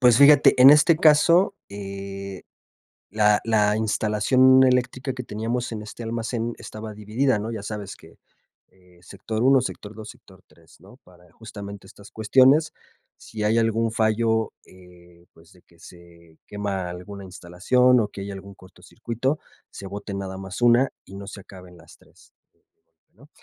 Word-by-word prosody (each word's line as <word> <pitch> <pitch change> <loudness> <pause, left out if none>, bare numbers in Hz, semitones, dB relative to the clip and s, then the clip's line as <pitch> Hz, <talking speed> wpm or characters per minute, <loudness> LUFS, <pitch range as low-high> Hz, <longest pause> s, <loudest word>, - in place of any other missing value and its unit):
Pues 125 -2 +5
fíjate, 140 -2 +6
en 135 - +10
este 150 +3 +5
caso, 165 +3 +4
eh, 100 -1 -8 0.7
la 105 0 +2
la 105 -2 +2
instalación 110 +5 +3
eléctrica 130 +1 0
que 125 0 -7
teníamos 115 +3 -4
en 110 -2 -6
este 110 +2 -10
almacén 115 +1 -4
estaba 110 0 -9
dividida, 110 +4 -1
¿no? 110 +3 -5
Ya 110 -3 -6
sabes 105 -1 -7
que, - - -19 0.5
eh, 90 -1 -25
sector 110 +4 -5
1, 135 +1 +5
sector 105 -4 -7
2, 110 0 -10
sector 95 -1 -20
3, 80 +1 -23
¿no? - - -18
Para 90 -1 -21
justamente 100 -3 -10
estas 100 +1 -16
cuestiones, 130 +8 +3 0.4
si 110 -1 -8
hay 110 +2 +1
algún 115 0 0
fallo, 110 0 0
eh, 90 -1 -19
pues, 80 +2 -21
de 90 - -22
que 85 - -27
se 85 -2 -17
quema 100 -3 -4
alguna 95 +3 -9
instalación, 100 +8 +1
o 110 - 0
que 100 - -10
haya 100 0 -6
algún 100 0 -11
cortocircuito, 120 +8 -5 0.3
se 100 - -9
bote 100 +1 -7
nada 95 -1 -6
más 95 +3 -8
una 120 +2 +4 0.2
y 95 - -13
no 100 0 -9
se 100 - -9
acaben 90 -2 -15
las 85 - -18
3, - - -24 0.8
¿no? - - -20
105 Hz, 160 wpm, -23 LUFS, 95-120 Hz, 0.8 s, en